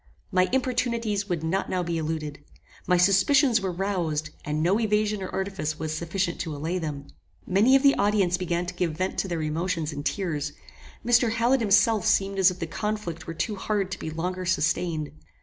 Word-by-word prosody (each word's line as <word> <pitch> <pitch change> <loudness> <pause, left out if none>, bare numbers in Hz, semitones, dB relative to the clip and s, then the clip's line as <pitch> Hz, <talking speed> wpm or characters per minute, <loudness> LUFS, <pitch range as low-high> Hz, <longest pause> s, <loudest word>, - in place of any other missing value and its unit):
My 185 -1 +3
importunities 235 -5 0
would 170 -3 -1
not 180 +5 -1
now 185 -1 0
be 170 -1 -2
eluded. 155 -2 -4 0.4
My 180 - +4
suspicions 225 - +4
were 190 -1 -1
roused, 170 -5 -2
and 150 +1 -1
no 190 +6 +3
evasion 210 -2 +1
or 185 - -4
artifice 190 -6 -3
was 155 -1 -3
sufficient 170 +2 -2
to 155 -2 -3
allay 165 +5 -2
them. 145 -4 -5 0.4
Many 210 +8 +4
of 270 - +4
the 280 -1 +7
audience 200 -3 +2
began 180 -1 -1
to 180 - -5
give 170 -3 -2
vent 185 +2 -2
to - - -1
their 170 -3 -2
emotions 160 0 -2
in 145 - -5
tears. 150 -1 -2 0.5
Mr. 240 -1 +4
Hallet 240 +4 +2
himself 220 +1 +3
seemed 195 0 +2
as 190 -1 +6
if 180 - -6
the 165 - -3
conflict 180 -1 -4
were 165 - -5
too 210 +6 -2
hard 195 -1 -1
to - - -4
be - - -4
longer 180 +4 -3
sustained. 165 -3 0
185 Hz, 190 wpm, -26 LUFS, 160-205 Hz, 0.5 s, the